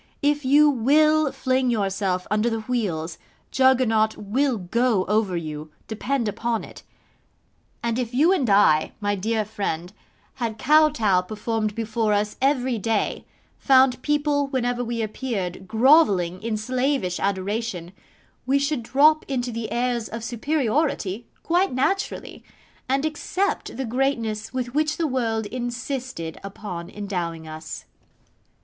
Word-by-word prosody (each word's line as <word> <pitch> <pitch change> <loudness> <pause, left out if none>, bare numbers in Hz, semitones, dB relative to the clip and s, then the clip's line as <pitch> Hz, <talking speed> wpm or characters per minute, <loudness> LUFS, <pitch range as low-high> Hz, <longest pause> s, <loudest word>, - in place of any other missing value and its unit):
If 290 0 +2
you 290 +3 +5
WILL 295 +3 +3
fling 260 0 0
yourself 195 -4 -1
under 210 +3 +2
the 225 -1 -2
wheels, 195 -9 -2 0.3
Juggernaut 245 -5 +3
will 250 +5 0
go 215 +2 +1
over 210 -3 +1
you, 155 -2 -6 0.2
depend 235 +2 -2
upon 225 +2 -2
it; - - -11 1.0
and 235 +1 0
if 240 -2 -2
you 305 +9 +4
and 275 - 0
I, 195 -6 +4
my 205 -1 0
dear 215 +2 -1
friend, 195 -4 -4 0.5
had 225 -2 -2
Kotow 285 -10 +4
performed 215 +2 -3
before 225 -1 0
us 210 +1 0
every 260 -3 +1
day, 220 +1 -1 0.3
found 260 -1 +4
people 295 -1 +1
whenever 245 -2 -1
we 230 -1 -2
appeared 200 -5 -4
grovelling 215 - +4
in 220 -1 -2
slavish 250 -4 -1
adoration, 195 -2 -2 0.6
we 275 +2 +3
should 280 -1 0
drop 295 +6 +4
into 250 -3 -2
the 230 -1 -5
airs 240 -2 -1
of 230 0 -6
superiority 240 -4 -1 0.2
quite 350 -1 +1
naturally, 385 +10 -2 0.5
and 275 +3 +1
accept 365 +6 -2
the 265 - -2
greatness 225 -3 -1
with 250 -1 -3
which 305 +1 +1
the 335 - 0
world 230 -6 -1
insisted 245 - -5
upon 195 -3 -7
endowing 175 -6 -4
us. 155 0 -8
230 Hz, 130 wpm, -24 LUFS, 205-265 Hz, 1.0 s, you